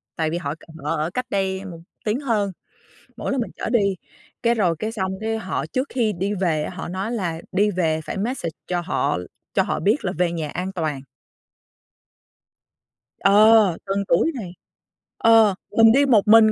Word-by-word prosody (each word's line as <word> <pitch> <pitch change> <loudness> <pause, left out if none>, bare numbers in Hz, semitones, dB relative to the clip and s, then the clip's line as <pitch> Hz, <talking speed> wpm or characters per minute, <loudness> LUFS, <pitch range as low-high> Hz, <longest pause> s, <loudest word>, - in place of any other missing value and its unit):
tại 160 -1 0
vì 170 - -2
họ 145 -3 -4
c - - -30 0.3
họ 150 - 0
ở 155 +1 -1
cách 250 - -2
đây 190 -1 -1
một 170 -4 -8 0.3
tiếng 215 +4 0
hơn, 220 -8 0 0.7
mỗi - - -3
lần 270 -2 0
mình 230 - -4
chở - - -4
đi 200 -5 +2 0.5
cái 235 0 +3
rồi 180 -7 +2
cái 220 - -2
xong 190 -4 -2
cái 225 0 -1
họ 190 -3 -3
trước 260 +2 -2
khi 230 -4 0
đi 195 +3 -2
về 170 -6 0
á, - - -4
họ 190 - -5
nói 190 +6 -3
là 175 -8 -3
đi 205 +3 +2
về 160 -4 0
phải - - -4
message 205 -4 -2 0.2
cho 175 -1 -1
họ 175 - 0 0.4
cho - - +3
họ - - -2
biết 210 - +1
là 180 - 0
về 175 -1 +2
nhà 160 -3 -3
an 185 +4 -4
toàn. 155 -7 -3 2.2
Ờ, 210 +3 +6 0.3
từng 195 +1 0
tuổi 185 - +3
này, 210 -9 -6 0.7
ờ, 225 -3 +5 0.2
mình 225 0 +8
đi 280 +4 +4
một 235 -7 +5
mình 220 0 +7
195 Hz, 195 wpm, -22 LUFS, 175-225 Hz, 2.2 s, mình